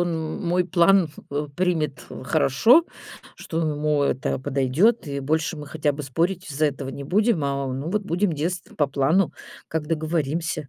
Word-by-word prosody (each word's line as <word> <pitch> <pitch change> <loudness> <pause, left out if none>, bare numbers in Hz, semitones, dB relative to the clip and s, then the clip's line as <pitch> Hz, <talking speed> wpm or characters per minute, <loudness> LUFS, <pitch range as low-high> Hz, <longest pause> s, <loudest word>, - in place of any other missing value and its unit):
он 175 - +1
м 160 0 -3
мой 180 +1 +2
план 180 0 +4 0.2
х 145 +1 -2
примет 160 -6 -1 0.2
хорошо, 155 - +4 0.5
что 165 - -4
ему 150 -2 0
это 130 -2 0
подойдёт, 140 - +2
и 140 -1 -3
больше 160 +4 -1
мы 150 -1 -8
хотя 150 -1 0
бы 145 +1 -6
спорить 170 +6 -1
из-за 150 +2 +1
этого 140 -2 -4
не 140 +1 -6
будем, 200 - +2
а, 140 -1 -1
ну, 135 +5 -4
вот 210 +2 0
будем 190 0 0
действовать 165 +4 -4
по 145 -2 +2
плану, 150 +7 +2 0.4
как 160 -1 -3
договоримся. 155 -1 -2
155 Hz, 170 wpm, -24 LUFS, 140-175 Hz, 0.5 s, план